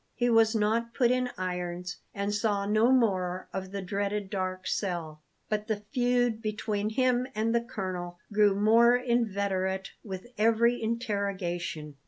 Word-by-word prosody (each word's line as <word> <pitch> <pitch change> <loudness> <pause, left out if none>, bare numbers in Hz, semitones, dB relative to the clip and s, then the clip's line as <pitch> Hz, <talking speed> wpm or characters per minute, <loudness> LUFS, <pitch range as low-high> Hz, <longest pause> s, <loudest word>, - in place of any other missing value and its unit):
He 245 0 +1
was 225 0 +4
not 225 +2 0
put 245 -3 +3
in 250 0 +1
irons, 180 -1 -4
and 200 +1 -2
saw 205 -1 0
no 215 +4 +3
more 185 -7 +1
of 190 -1 -4
the 200 -1 -4
dreaded 200 +1 -2
dark 185 -2 -3
cell; 165 -6 -3 0.3
but 215 -1 -2
the 210 -2 -2
feud 245 -3 +2
between 215 -1 -2
him 250 +2 +1
and 220 +2 +1
the 235 - +3
colonel 185 -7 -5 0.2
grew 205 -1 +4
more 230 +4 +5
inveterate 200 -6 0
with 190 -2 -6
every 230 +2 +3
interrogation. 200 - -3
210 Hz, 145 wpm, -29 LUFS, 190-230 Hz, 0.3 s, more